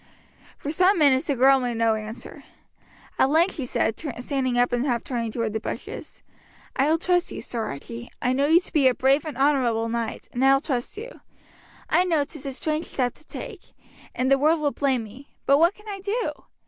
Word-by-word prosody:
For 290 Hz, -, -4 dB
some 370 Hz, +5 st, +3 dB
minutes 280 Hz, -2 st, +4 dB
the 285 Hz, -, +1 dB
girl 270 Hz, +2 st, +5 dB
made 245 Hz, -2 st, -2 dB
no 225 Hz, -1 st, +3 dB
answer. 220 Hz, +1 st, -7 dB, 0.8 s
At 265 Hz, -, +4 dB
length 330 Hz, +6 st, +3 dB
she 265 Hz, -4 st, -4 dB
said, 225 Hz, -2 st, -1 dB, 0.2 s
standing 255 Hz, -1 st, -1 dB
up, 245 Hz, 0 st, +3 dB
and 245 Hz, 0 st, +1 dB
half 245 Hz, -4 st, 0 dB
turning 235 Hz, -3 st, -3 dB
toward 225 Hz, -1 st, -2 dB
the 220 Hz, -, -1 dB
bushes: -, -, -7 dB, 0.5 s
"I 275 Hz, +3 st, +2 dB
will 320 Hz, -, +3 dB
trust 355 Hz, +1 st, +1 dB
you, -, -, -6 dB
Sir 230 Hz, -2 st, -4 dB
Archie. 235 Hz, +12 st, -7 dB
I 250 Hz, -, +1 dB
know 280 Hz, +2 st, +2 dB
you 325 Hz, +3 st, +6 dB
to 365 Hz, -, -11 dB
be 290 Hz, -5 st, +5 dB
a 255 Hz, -, +3 dB
brave 275 Hz, +2 st, +2 dB
and 300 Hz, -6 st, -6 dB
honourable 250 Hz, -5 st, +2 dB
knight, 230 Hz, -1 st, -3 dB
and 245 Hz, -, -1 dB
I 270 Hz, 0 st, +6 dB
will 270 Hz, -, +4 dB
trust 270 Hz, +2 st, -3 dB
you. 480 Hz, +4 st, -9 dB, 0.7 s
I 355 Hz, -, +3 dB
know 330 Hz, -5 st, +2 dB
'tis 285 Hz, 0 st, -8 dB
a -, -, -2 dB
strange 310 Hz, +4 st, -2 dB
step 250 Hz, -3 st, -1 dB
to 310 Hz, -, -20 dB
take, -, -, -9 dB, 0.4 s
and 260 Hz, +1 st, 0 dB
the 275 Hz, -, +5 dB
world 310 Hz, +3 st, +3 dB
will 295 Hz, -1 st, +1 dB
blame 265 Hz, -5 st, 0 dB
me; 250 Hz, +7 st, -14 dB
but 275 Hz, +1 st, +5 dB
what 340 Hz, +4 st, +4 dB
can 420 Hz, +1 st, -18 dB
I 400 Hz, -2 st, -5 dB
do? 415 Hz, +5 st, -1 dB
270 Hz, 215 wpm, -24 LUFS, 245-310 Hz, 0.8 s, you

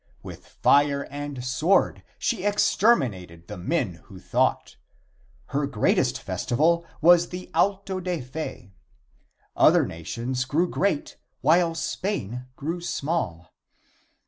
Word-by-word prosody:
With -, -, -10 dB
fire 140 Hz, 0 st, +3 dB
and 145 Hz, -3 st, -5 dB
sword 155 Hz, +9 st, +2 dB, 0.2 s
she 220 Hz, -7 st, -1 dB
exterminated 120 Hz, -, +1 dB
the 105 Hz, -, -7 dB
men 95 Hz, -, -2 dB
who 95 Hz, -, -13 dB
thought. -, -, 0 dB, 0.7 s
Her 140 Hz, 0 st, 0 dB
greatest 120 Hz, -7 st, +1 dB
festival 170 Hz, +7 st, 0 dB
was 175 Hz, +1 st, +6 dB
the 180 Hz, 0 st, -8 dB
Auto 195 Hz, -1 st, +1 dB
da 180 Hz, -2 st, -2 dB
Fe. 125 Hz, -7 st, -7 dB, 0.8 s
Other -, -, +5 dB
nations 115 Hz, +10 st, -4 dB
grew 155 Hz, +7 st, +1 dB
great 180 Hz, -5 st, -1 dB, 0.2 s
while 165 Hz, +1 st, +3 dB
Spain 125 Hz, -, -3 dB
grew 165 Hz, +5 st, -4 dB
small. 140 Hz, -, -3 dB
145 Hz, 110 wpm, -25 LUFS, 120-175 Hz, 0.8 s, was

